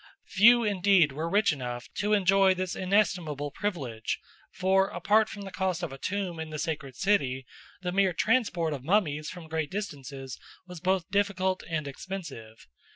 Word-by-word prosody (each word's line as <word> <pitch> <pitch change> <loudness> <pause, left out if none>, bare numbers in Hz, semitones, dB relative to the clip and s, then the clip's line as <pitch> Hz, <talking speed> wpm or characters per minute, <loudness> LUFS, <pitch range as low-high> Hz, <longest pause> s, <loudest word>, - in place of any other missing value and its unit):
Few 235 +4 +6
indeed 195 -6 +4
were 155 +4 -3
rich 200 -1 +3
enough 125 -3 -5
to 210 +1 +1
enjoy 195 -1 +4
this 185 -1 -3
inestimable 180 -7 0
privilege; 135 - -3 0.3
for, 190 +1 +2
apart 210 +6 +2
from 205 - -8
the 195 - -8
cost 185 -2 -1
of 160 - -3
a 135 - -10
tomb 185 -2 -3
in 160 0 -5
the 155 - -5
sacred 150 -5 -4
city, 135 -9 +1 0.4
the 180 - -1
mere 195 0 +3
transport 180 -5 +1
of 135 -3 -6
mummies 155 -4 +1
from 175 -3 -9
great 160 -2 -2
distances 140 -9 -6 0.3
was 180 -2 -9
both 185 0 0
difficult 190 -2 +1
and 155 -3 -2
expensive. 140 - -8
180 Hz, 160 wpm, -28 LUFS, 150-195 Hz, 0.4 s, Few